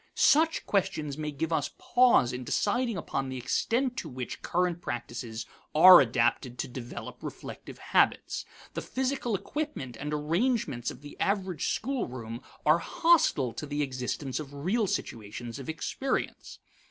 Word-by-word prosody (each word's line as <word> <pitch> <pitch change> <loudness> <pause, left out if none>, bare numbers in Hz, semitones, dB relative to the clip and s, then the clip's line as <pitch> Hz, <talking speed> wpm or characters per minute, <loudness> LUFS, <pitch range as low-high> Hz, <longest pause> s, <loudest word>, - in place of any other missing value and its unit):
Such 320 +2 +4
questions 155 -7 0
may 150 0 -3
give 155 +3 -2
us - - +1
pause 245 - +4
in 125 +1 -4
deciding 230 - 0
upon 135 -5 -3
the 130 - -4
extent 235 - 0
to 160 - -4
which 125 -2 -6
current 175 -1 0
practices 120 -3 -5 0.3
are 180 +2 +11
adapted 120 0 +1
to - - -2
develop 120 -1 -8
reflective - - -8
habits. - - +1 0.3
The - - -3
physical 260 -3 -1
equipment 285 - -4
and 150 +1 -4
arrangements 150 - 0
of - - -9
the 145 0 -10
average 190 -5 0
schoolroom 125 - -4 0.2
are 155 +3 +5
hostile 225 - +3
to 150 - -6
the 145 +1 -1
existence 130 +1 -3
of 145 -3 -7
real 195 +10 0
situations 115 - -4
of 135 - -7
experience. 260 +11 -3
150 Hz, 140 wpm, -29 LUFS, 125-210 Hz, 0.3 s, are